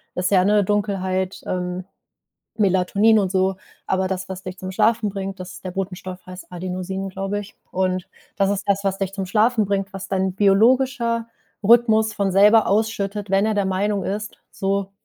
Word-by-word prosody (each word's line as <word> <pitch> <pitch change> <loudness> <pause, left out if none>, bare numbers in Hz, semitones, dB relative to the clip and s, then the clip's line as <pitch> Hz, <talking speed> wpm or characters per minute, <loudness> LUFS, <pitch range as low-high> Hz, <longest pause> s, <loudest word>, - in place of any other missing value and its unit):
ist 180 +2 0
ja, 185 -2 +4
ne, 205 0 +4
Dunkelheit, 190 -2 -1
ähm, 180 0 -3 0.8
Melatonin 200 +3 +3
und 190 -2 0
so, 190 0 +1 0.3
aber 190 0 0
das, 190 0 -4
was 190 -1 -6
dich 185 0 -7
zum 185 0 -6
Schlafen 220 +2 +2
bringt, 195 -1 -5
dass 185 0 -7
ist - - -12
der - - -2
Botenstoff 185 -1 -6
heißt 185 0 -11
Adenosin, 185 +2 -4
glaube 195 +2 -3
ich. 205 0 -10 0.2
Und 185 -1 -1 0.3
das 195 -1 +2
ist 200 0 -2
das, 200 0 +1
was 195 -1 0
dich 195 -1 -3
zum 195 -2 -4
Schlafen 220 +3 +2
bringt, 200 0 -2
was 195 0 -6
dein 190 -1 0
biologischer 230 +4 +3 0.4
Rhythmus 220 0 +4
von 200 -2 0
selber 210 +3 +6
ausschüttet, 205 -1 -1
wenn 195 +2 +3
er 220 - +1
der 205 -1 +1
Meinung 195 +1 0
ist: 210 +3 -4
„So, 195 0 -2
195 Hz, 180 wpm, -22 LUFS, 185-210 Hz, 0.8 s, selber